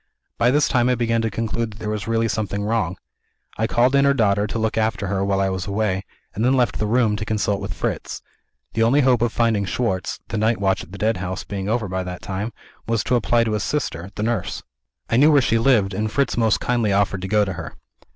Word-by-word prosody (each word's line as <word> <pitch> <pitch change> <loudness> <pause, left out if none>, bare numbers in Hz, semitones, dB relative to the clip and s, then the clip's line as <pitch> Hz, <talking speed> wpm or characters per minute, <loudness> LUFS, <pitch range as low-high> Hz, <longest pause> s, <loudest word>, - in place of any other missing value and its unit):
By 120 +1 +4
this 145 +3 +3
time 125 -2 +2
I 125 - +3
began 115 -1 +1
to 115 - 0
conclude 115 +1 -3
that - - -14
there 105 -1 -3
was 105 -1 -4
really 115 0 +1
something 100 -2 -2
wrong. 105 -4 -1 0.6
I 110 - +2
called 125 +3 +2
in 140 0 +4
her 140 0 +4
daughter 105 -3 +2
to 110 - -4
look 110 0 -1
after 110 -2 0
her 95 0 -1
while 100 -1 +1
I 95 0 +1
was 95 -1 -4
away, 100 -2 -1 0.3
and 110 - -2
then 125 +2 +3
left 125 -3 +1
the 105 - 0
room 115 -1 +2
to 105 - -3
consult 105 -2 -1
with 100 -1 -5
Fritz. - - -4 0.5
The 115 - 0
only 125 +6 +4
hope 125 -3 +3
of 120 -1 +2
finding 115 -3 +1
Schwartz 95 -2 -2
(the 110 - -2
night 110 +1 +1
watch 95 -1 +1
at - - -14
the 100 - -8
Deadhouse 95 -3 -1
being 100 -1 -4
over 110 -2 0
by 95 0 -2
that 90 -1 -7
time) 100 +3 -3 0.4
was 115 -1 0
to 125 - +1
apply 120 0 +2
to 115 - -1
his 105 - -1
sister 95 - -2
the 105 - -3
nurse. 115 -5 -2 0.4
I 115 - +1
knew 150 +4 +6
where 145 - +6
she 115 -3 +2
lived; 115 -6 +3
and 105 +2 -2
Fritz 140 +2 0
most 115 -3 +2
kindly 120 -4 0
offered 100 -1 +1
to 95 - -4
go 105 +1 +3
to 95 - -3
her. 85 -1 -7
110 Hz, 245 wpm, -22 LUFS, 100-115 Hz, 0.6 s, knew